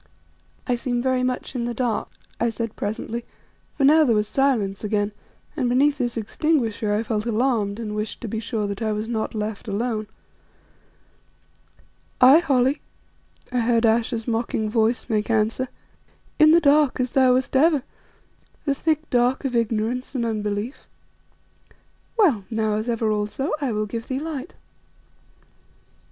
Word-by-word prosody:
"I 250 Hz, -, 0 dB
seem 245 Hz, 0 st, -1 dB
very 260 Hz, 0 st, +1 dB
much 255 Hz, +1 st, -2 dB
in 240 Hz, -3 st, -2 dB
the 240 Hz, 0 st, -3 dB
dark," 235 Hz, -3 st, -1 dB, 0.3 s
I 235 Hz, -, +2 dB
said 230 Hz, 0 st, -4 dB
presently; 220 Hz, +3 st, -4 dB, 0.5 s
for 280 Hz, -, 0 dB
now 310 Hz, +3 st, +6 dB
there 240 Hz, -6 st, +3 dB
was 210 Hz, 0 st, +1 dB
silence 225 Hz, -8 st, 0 dB
again, 210 Hz, -1 st, 0 dB, 0.4 s
and 255 Hz, -6 st, 0 dB
beneath 280 Hz, +4 st, +3 dB
this 240 Hz, -2 st, -1 dB
extinguisher 225 Hz, -3 st, 0 dB
I 210 Hz, +2 st, +1 dB
felt 220 Hz, 0 st, -2 dB
alarmed 225 Hz, -3 st, 0 dB
and 215 Hz, -2 st, -4 dB
wished 210 Hz, +1 st, -4 dB
to 235 Hz, -, -5 dB
be 220 Hz, +1 st, -3 dB
sure 220 Hz, -1 st, -2 dB
that 200 Hz, +1 st, -4 dB
I 220 Hz, -1 st, 0 dB
was 210 Hz, +1 st, -3 dB
not 225 Hz, -1 st, -3 dB
left 210 Hz, 0 st, -4 dB
alone. 215 Hz, +1 st, -2 dB, 2.1 s
"Aye 265 Hz, +5 st, +8 dB
Holly," 275 Hz, -3 st, +1 dB, 0.7 s
I 250 Hz, -, 0 dB
heard 230 Hz, 0 st, +2 dB
Ayesha's 225 Hz, +1 st, +1 dB
mocking 225 Hz, -2 st, -1 dB
voice 225 Hz, +1 st, +1 dB
make 215 Hz, -2 st, -1 dB
answer, 225 Hz, +3 st, +1 dB, 0.7 s
"in 310 Hz, -, +7 dB
the 330 Hz, +2 st, +7 dB
dark, 290 Hz, -3 st, +3 dB
as 250 Hz, -1 st, 0 dB
thou 260 Hz, -2 st, +4 dB
wast 260 Hz, +1 st, -1 dB
ever, 295 Hz, -1 st, +4 dB, 0.8 s
the 280 Hz, -, +2 dB
thick 315 Hz, +2 st, -1 dB
dark 250 Hz, +3 st, +2 dB
of 255 Hz, -2 st, -1 dB
ignorance 230 Hz, +3 st, -1 dB
and 240 Hz, -2 st, 0 dB
unbelief. 210 Hz, +2 st, -3 dB, 1.3 s
Well, 300 Hz, -, +3 dB
now, 220 Hz, -1 st, 0 dB
as 215 Hz, +3 st, -3 dB
ever 225 Hz, -2 st, 0 dB
also, 210 Hz, +7 st, -2 dB
I 270 Hz, -4 st, 0 dB
will 215 Hz, 0 st, -1 dB
give 230 Hz, +2 st, -6 dB
thee 260 Hz, 0 st, -2 dB
light." 305 Hz, 0 st, -6 dB
235 Hz, 155 wpm, -23 LUFS, 215-260 Hz, 2.1 s, Aye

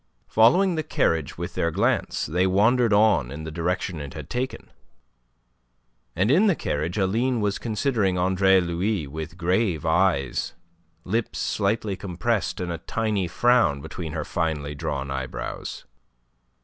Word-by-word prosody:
Following 175 Hz, -, +5 dB
the 160 Hz, -, -1 dB
carriage 80 Hz, -, 0 dB
with -, -, -5 dB
their 85 Hz, -, 0 dB
glance, 80 Hz, -, 0 dB
they 90 Hz, +3 st, +1 dB
wandered 110 Hz, +5 st, +3 dB
on 105 Hz, -, +4 dB
in 75 Hz, +4 st, -7 dB
the 80 Hz, -, -6 dB
direction 85 Hz, +1 st, -2 dB
it 70 Hz, -2 st, -8 dB
had 75 Hz, -1 st, -8 dB
taken. 125 Hz, +2 st, -4 dB, 1.4 s
And 95 Hz, +7 st, +2 dB
in 190 Hz, +9 st, +5 dB
the 195 Hz, -, +3 dB
carriage 80 Hz, -, -2 dB
Aline 115 Hz, +6 st, +1 dB
was 105 Hz, -2 st, -1 dB
considering 110 Hz, -5 st, 0 dB
Andre 95 Hz, +1 st, +4 dB
Louis 90 Hz, +1 st, -1 dB
with 80 Hz, +4 st, -7 dB
grave 90 Hz, -1 st, 0 dB
eyes, 80 Hz, -5 st, +1 dB, 0.5 s
lips 110 Hz, +5 st, -2 dB
slightly 105 Hz, 0 st, -1 dB
compressed, 100 Hz, +4 st, -2 dB
and 90 Hz, -1 st, -3 dB
a 85 Hz, -, -4 dB
tiny 105 Hz, -3 st, -1 dB
frown 90 Hz, -, +3 dB
between 80 Hz, +1 st, -6 dB
her 75 Hz, -2 st, -3 dB
finely 80 Hz, -4 st, -2 dB
drawn 70 Hz, -1 st, -4 dB
eyebrows. 65 Hz, -1 st, -5 dB
95 Hz, 140 wpm, -24 LUFS, 80-110 Hz, 1.4 s, Following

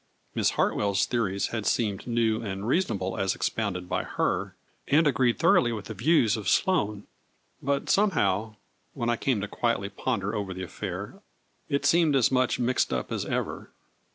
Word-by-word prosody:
Miss -, -, +2 dB
Hartwell's 100 Hz, -2 st, +2 dB
theories 100 Hz, -5 st, -1 dB
had 110 Hz, -3 st, -3 dB
seemed 105 Hz, -3 st, 0 dB
new 115 Hz, -2 st, +1 dB
and 100 Hz, -1 st, -4 dB
reasonable 110 Hz, -, 0 dB
as 95 Hz, -1 st, +1 dB
expounded 90 Hz, -5 st, -2 dB
by -, -, -1 dB
her, -, -, -2 dB, 0.3 s
and 155 Hz, +3 st, +4 dB
agreed 125 Hz, -3 st, +2 dB
thoroughly 120 Hz, -, +4 dB
with 105 Hz, -4 st, -5 dB
the -, -, -6 dB
views 125 Hz, -5 st, +3 dB
of 110 Hz, -3 st, -2 dB
Sloane, 105 Hz, -, +1 dB, 0.6 s
but 140 Hz, 0 st, -1 dB
some 210 Hz, +1 st, +4 dB
how, 105 Hz, -, 0 dB, 0.4 s
when 120 Hz, 0 st, 0 dB
I -, -, +2 dB
came 120 Hz, -4 st, 0 dB
to 100 Hz, -, -3 dB
quietly 115 Hz, -3 st, -1 dB
ponder 100 Hz, -1 st, -2 dB
over 100 Hz, -4 st, -3 dB
the 95 Hz, -, -5 dB
affair, 95 Hz, -, -6 dB, 0.5 s
it 140 Hz, -, 0 dB
seemed 165 Hz, -4 st, +4 dB
as 130 Hz, -2 st, +3 dB
much 130 Hz, -1 st, +2 dB
mixed 125 Hz, +1 st, +1 dB
up -, -, -2 dB
as -, -, -2 dB
ever. -, -, -3 dB
115 Hz, 170 wpm, -27 LUFS, 100-130 Hz, 0.6 s, and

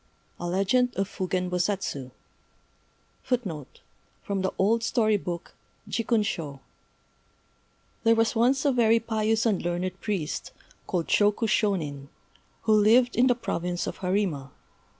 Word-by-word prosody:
A 175 Hz, -, -3 dB
Legend 200 Hz, +8 st, +1 dB
of 195 Hz, 0 st, 0 dB
Fugen 185 Hz, -2 st, -2 dB
Bosatsu 180 Hz, -7 st, -2 dB, 1.1 s
[Decoration] 195 Hz, -, -2 dB, 0.6 s
From 200 Hz, -1 st, -2 dB
the 190 Hz, -, 0 dB
old 225 Hz, +4 st, +2 dB
story 225 Hz, -1 st, +2 dB
book, 175 Hz, -3 st, -5 dB, 0.3 s
Jikkun 230 Hz, -1 st, +1 dB
shô 150 Hz, -8 st, -4 dB, 1.4 s
THERE 230 Hz, -1 st, +5 dB
was 225 Hz, +1 st, +2 dB
once 260 Hz, +5 st, +2 dB
a 285 Hz, -, +4 dB
very 230 Hz, -2 st, +4 dB
pious 220 Hz, 0 st, 0 dB
and 210 Hz, -5 st, +2 dB
learned 175 Hz, +2 st, -3 dB
priest, 190 Hz, -8 st, -3 dB, 0.3 s
called 175 Hz, -3 st, -1 dB
Shôku 210 Hz, +2 st, +2 dB
Shônin, 160 Hz, -11 st, 0 dB, 0.6 s
who 220 Hz, -, +3 dB
lived 225 Hz, +4 st, +5 dB
in 250 Hz, +2 st, +4 dB
the 245 Hz, -, +4 dB
province 175 Hz, -6 st, -3 dB
of -, -, -5 dB
Harima. 180 Hz, -8 st, -1 dB
205 Hz, 130 wpm, -27 LUFS, 180-230 Hz, 1.4 s, THERE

